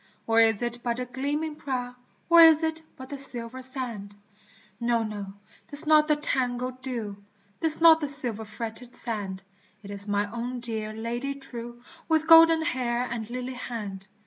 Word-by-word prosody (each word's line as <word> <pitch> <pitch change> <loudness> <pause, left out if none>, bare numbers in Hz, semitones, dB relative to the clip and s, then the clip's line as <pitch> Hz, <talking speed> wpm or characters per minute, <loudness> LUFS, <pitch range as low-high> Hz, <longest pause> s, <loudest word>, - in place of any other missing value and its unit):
Or 225 0 +2
is 225 0 +2
it 240 0 -4
but 235 -1 -3
the 250 - -4
gleaming 290 +5 -4
prow, 250 -4 -5 0.3
Or 340 0 +7
is 320 -1 +7
it 320 0 -2 0.2
but 260 0 -11
the 280 - -7
silver 250 -1 -3
sand? 240 -6 -2 0.6
No! 235 -1 0
no! 210 -2 -6 0.4
'tis 290 +2 +4
not 305 0 +4
the 300 - +2
tangled 255 -3 -3
dew, 230 -6 -6 0.4
'Tis 320 0 +4
not 325 -1 +6
the 295 - -2
silver 245 -6 +3
fretted 225 +3 -8
sand, 200 -5 0 0.4
It 200 - -10
is 200 0 +1
my 205 0 0
own 245 +2 -5
dear 220 -2 +3
Lady 240 +5 -5
true 240 -3 -8 0.3
With 315 -1 +1
golden 330 0 +6
hair 250 -7 -2
and 225 -2 -5
lily 250 +1 -5
hand 210 -6 -7
245 Hz, 170 wpm, -26 LUFS, 225-280 Hz, 0.6 s, Or